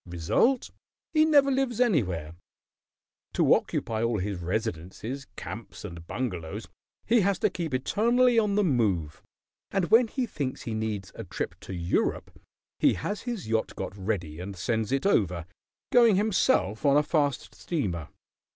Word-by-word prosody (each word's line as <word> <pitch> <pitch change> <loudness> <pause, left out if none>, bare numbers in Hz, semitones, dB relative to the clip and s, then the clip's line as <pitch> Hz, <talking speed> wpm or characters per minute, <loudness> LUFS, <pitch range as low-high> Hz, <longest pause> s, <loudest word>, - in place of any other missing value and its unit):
Result, 90 - +1 0.4
he 310 -1 +5
never 285 -3 +5
lives 260 -3 0
anywhere. 95 - +1 1.0
To - - +4
occupy 110 -1 -1
all 115 -1 +1
his 100 -1 -3
residences, 110 - -4
camps, - - -8
and 85 0 -9
bungalows 95 -8 -4 0.4
he 235 -1 +4
has 200 0 +2
to - - +1
keep 170 -3 -4
eternally 235 - +3
on 210 -2 +1
the 210 - +3
move, 105 - 0 0.5
and 195 -1 -1
when 230 +2 +7
he 255 +3 -2
thinks 140 - -4
he 115 - -4
needs 110 -4 -3
a - - -7
trip - - -4
to - - -8
Europe 85 0 -1 0.5
he - - +4
has 205 +1 -3
his 230 - -4
yacht 110 0 -1
got - - -5
ready 95 -6 -3
and 95 +2 -6
sends 110 +4 -1
it 135 +4 0
over, 90 - +2 0.5
going 235 -4 +6
himself 185 - +2
on 140 -1 +5
a 150 - +4
fast 145 -3 0
steamer. 95 - -3
125 Hz, 150 wpm, -27 LUFS, -, 1.0 s, when